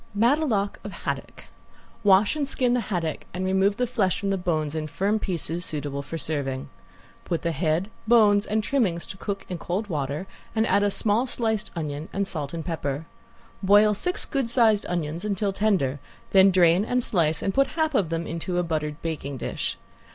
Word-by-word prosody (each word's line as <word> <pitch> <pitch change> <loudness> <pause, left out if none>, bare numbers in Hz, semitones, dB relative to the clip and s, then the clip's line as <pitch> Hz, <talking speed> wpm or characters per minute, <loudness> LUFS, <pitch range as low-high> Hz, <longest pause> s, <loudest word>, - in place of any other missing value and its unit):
~METELOTE 230 -3 +2
OF - - -6
HADDOCK~ - - -5 0.6
Wash 200 +4 +5
and 290 -2 -1
skin 250 -3 +1
the 250 - +2
haddock 165 -6 -2
and 185 +1 -2
remove 190 +2 +2
the 250 - +1
flesh 225 -7 0
from 200 -1 -1
the - - +2
bones 155 -5 -1
in 155 -1 -3
firm 200 +7 0
pieces 175 -3 -2
suitable 145 -3 -4
for 155 +4 -6
serving. 140 -4 -3 0.5
Put 170 - -2
the 170 - +1
head, 165 +6 0 0.2
bones 210 -3 +5
and 215 +1 0
trimmings 205 -11 0
to 190 - -8
cook 195 0 -4
in 180 -2 -5
cold 200 +6 -3
water 145 +1 -2 0.3
and 220 0 +3
add 205 - +3
a 205 - +3
small 220 +5 +2
sliced 220 -3 0
onion 150 -1 -4
and 200 0 -1
salt 150 -6 -4
and 165 -2 -5
pepper. 155 -3 -3 0.6
Boil 205 +2 +5
six 360 - -1
good 270 -5 -1
sized 225 -4 +3
onions 170 0 -3
until 200 -1 -1
tender, 185 -10 +1 0.3
then 190 0 +7
drain 180 0 +4
and 250 +2 0
slice 160 -7 +2
and 195 - 0
put 275 0 +3
half 315 -1 +1
of 195 -11 +2
them 165 0 -2
into 170 +2 -3
a 180 - +2
buttered 155 -2 -2
baking 145 -4 -4
dish. - - -3
190 Hz, 190 wpm, -25 LUFS, 160-210 Hz, 0.6 s, then